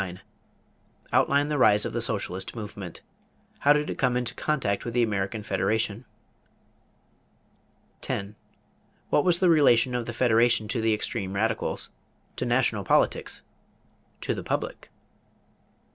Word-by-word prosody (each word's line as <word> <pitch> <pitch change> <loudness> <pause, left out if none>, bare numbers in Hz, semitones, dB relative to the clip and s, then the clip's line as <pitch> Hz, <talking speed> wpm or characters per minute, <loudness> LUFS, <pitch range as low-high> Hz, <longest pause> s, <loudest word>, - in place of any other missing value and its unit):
Outline 145 +1 +3
the 150 -2 -1
rise 105 -4 +5
of - - -4
the 120 - -1
socialist 95 -4 -3
movement. 105 -5 -8 0.6
How 145 - +4
did 150 +1 +3
it - - -5
come 125 -2 +2
into 125 -1 -2
contact 130 -10 -1
with 120 0 -5
the 120 - +4
American 105 0 -2
Federation? 110 +2 -1 2.0
10. 100 +2 -4 0.8
What 145 - +4
was 175 -1 +3
the 185 - +4
relation 125 -6 +4
of 120 -1 -2
the 120 - -4
Federation 115 -1 +3
to 115 -1 -1
the 110 -1 +2
extreme 105 -3 -4
radicals? 110 +2 -1 0.5
To - - -2
national - - +1
politics? - - +1 0.8
To - - -1
the - - -5
public? - - -4
115 Hz, 130 wpm, -26 LUFS, 105-130 Hz, 2.0 s, rise